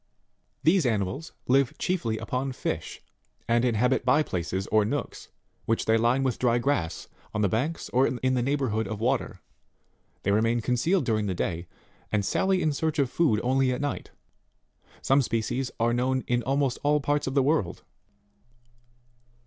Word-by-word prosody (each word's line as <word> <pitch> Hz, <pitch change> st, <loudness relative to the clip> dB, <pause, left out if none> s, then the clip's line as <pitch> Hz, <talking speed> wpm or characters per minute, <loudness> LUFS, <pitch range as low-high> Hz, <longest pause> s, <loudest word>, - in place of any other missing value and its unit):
These 165 Hz, -3 st, +4 dB
animals 110 Hz, -, -2 dB, 0.2 s
live 135 Hz, +3 st, +2 dB
chiefly 120 Hz, -12 st, -1 dB
upon 130 Hz, +3 st, -3 dB
fish, -, -, -4 dB, 0.4 s
and 115 Hz, +1 st, +2 dB
in 120 Hz, -3 st, +2 dB
habit 125 Hz, +4 st, +2 dB
bye 135 Hz, +5 st, +4 dB
places, 95 Hz, -, -3 dB
or 110 Hz, 0 st, +4 dB
nooks, 105 Hz, -, -4 dB, 0.4 s
which 115 Hz, -, 0 dB
they 110 Hz, -, +3 dB
line 120 Hz, +4 st, +2 dB
with 130 Hz, -3 st, -1 dB
dry 120 Hz, -1 st, +3 dB
grass, 120 Hz, -, -1 dB, 0.3 s
on 105 Hz, -, +1 dB
the -, -, +4 dB
banks, 130 Hz, -, -2 dB
or 130 Hz, +2 st, +3 dB
in 130 Hz, 0 st, 0 dB
the 125 Hz, -, +1 dB
neighbourhood 125 Hz, -5 st, 0 dB
of 105 Hz, 0 st, -5 dB
water; 125 Hz, +3 st, -1 dB, 0.8 s
they 100 Hz, -, +1 dB
remain 115 Hz, +3 st, +2 dB
concealed 125 Hz, -, +1 dB
during 110 Hz, -3 st, 0 dB
the 95 Hz, -, -2 dB
day, 85 Hz, 0 st, -3 dB, 0.4 s
and 105 Hz, -2 st, +1 dB
sally 190 Hz, -, +1 dB
in 155 Hz, -, +2 dB
search 160 Hz, +2 st, -1 dB
of 135 Hz, -4 st, +1 dB
food 140 Hz, -11 st, +2 dB
only 130 Hz, +1 st, +2 dB
at 125 Hz, -, -2 dB
night. 145 Hz, 0 st, -3 dB, 0.9 s
Some 135 Hz, +1 st, +4 dB
species 120 Hz, +2 st, -1 dB
are 115 Hz, +1 st, +2 dB
known 130 Hz, +2 st, 0 dB
in 120 Hz, 0 st, +1 dB
almost 135 Hz, 0 st, 0 dB
all 150 Hz, +1 st, +3 dB
parts 145 Hz, 0 st, 0 dB
of 135 Hz, -, -3 dB
the 135 Hz, -, +4 dB
world. 130 Hz, -, 0 dB
125 Hz, 165 wpm, -27 LUFS, 110-140 Hz, 0.9 s, These